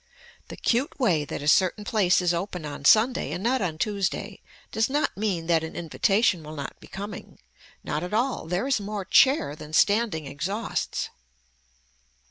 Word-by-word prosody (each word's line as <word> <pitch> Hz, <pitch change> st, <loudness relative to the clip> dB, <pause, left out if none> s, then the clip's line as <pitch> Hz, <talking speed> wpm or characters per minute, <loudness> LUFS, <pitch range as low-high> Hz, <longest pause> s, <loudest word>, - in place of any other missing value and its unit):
The -, -, -9 dB
cute 245 Hz, +6 st, 0 dB
way 170 Hz, -, +2 dB
that 145 Hz, -, -6 dB
a -, -, -4 dB
certain 185 Hz, +6 st, +3 dB
place 195 Hz, -4 st, +2 dB
is 175 Hz, -1 st, +2 dB
open 180 Hz, -1 st, -4 dB
on 145 Hz, -1 st, -7 dB
Sunday 225 Hz, -, +4 dB
and 180 Hz, -, -4 dB
not 255 Hz, +2 st, +1 dB
on 165 Hz, -5 st, -2 dB
Tuesday 200 Hz, +1 st, -2 dB, 0.3 s
does 225 Hz, +2 st, +1 dB
not 290 Hz, +3 st, 0 dB
mean 195 Hz, -5 st, -2 dB
that 165 Hz, -1 st, +2 dB
an 160 Hz, -, -6 dB
invitation 185 Hz, +3 st, +1 dB
will 155 Hz, 0 st, -9 dB
not 140 Hz, -2 st, -7 dB
be -, -, -14 dB
coming. 200 Hz, +2 st, -8 dB, 0.5 s
Not -, -, -3 dB
at 180 Hz, -, -5 dB
all, 235 Hz, -5 st, -1 dB
there 180 Hz, +7 st, -1 dB
is 270 Hz, -4 st, +1 dB
more 205 Hz, -1 st, -5 dB
chair 260 Hz, -, +4 dB
than 155 Hz, 0 st, -11 dB
standing 205 Hz, -4 st, +2 dB
exhausts. 175 Hz, +11 st, -3 dB
195 Hz, 170 wpm, -26 LUFS, 160-220 Hz, 0.5 s, Sunday